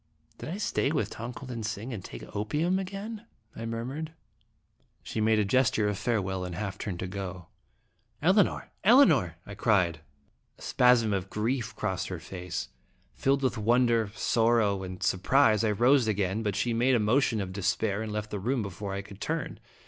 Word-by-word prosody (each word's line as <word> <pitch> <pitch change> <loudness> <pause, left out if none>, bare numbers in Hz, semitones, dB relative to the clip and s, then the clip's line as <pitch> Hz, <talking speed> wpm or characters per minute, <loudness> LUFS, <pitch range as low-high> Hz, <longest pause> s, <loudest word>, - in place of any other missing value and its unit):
" - - -36
Did - - -6
I 180 - -3
stay 175 -8 0
with 110 -9 -1
Tong 115 +2 -6
ko 125 +3 -9
lin 120 -3 -5
sing, 110 +3 -4
and 100 -5 -6
take - - -10
opium 150 - 0
again?" 205 +4 -6 0.3
I 115 - -5
murmured. 130 +8 -4 0.9
She 110 - -3
made 110 0 +3
a 105 - +2
gesture 115 -1 +2
of 105 - 0
farewell 95 -3 -1
and 90 -1 -5
half 100 -1 -4
turned 95 -5 -4
to 95 - -3
go. 95 -2 -6 0.7
"Elinor! 185 +4 +2
Elinor!" 170 - +5
I 100 - -8
cried. 90 -6 +2 0.6
A - - -20
spasm 120 -4 +4
of 95 -1 -2
grief 115 +3 -2
crossed 90 -3 -2
her 90 - -4
face. 90 +1 -5 0.4
Filled 135 - +1
with 130 -4 0
wonder, 115 -1 +3
sorrow, 110 -3 +2
and 95 -1 -6
surprise, 110 +3 +3
I 110 - +2
rose 120 +4 +4
again, 100 0 0
but 105 -3 -1
she 115 +3 0
made 125 +3 +3
a - - +3
motion 115 +2 +2
of 95 -2 -4
despair 100 +2 0
and 110 -1 -4
left 105 0 -4
the 105 - -3
room 120 +4 0
before 100 0 -5
I 100 - -4
could 100 -1 -13
turn. - - -3
110 Hz, 185 wpm, -28 LUFS, 100-125 Hz, 0.9 s, Elinor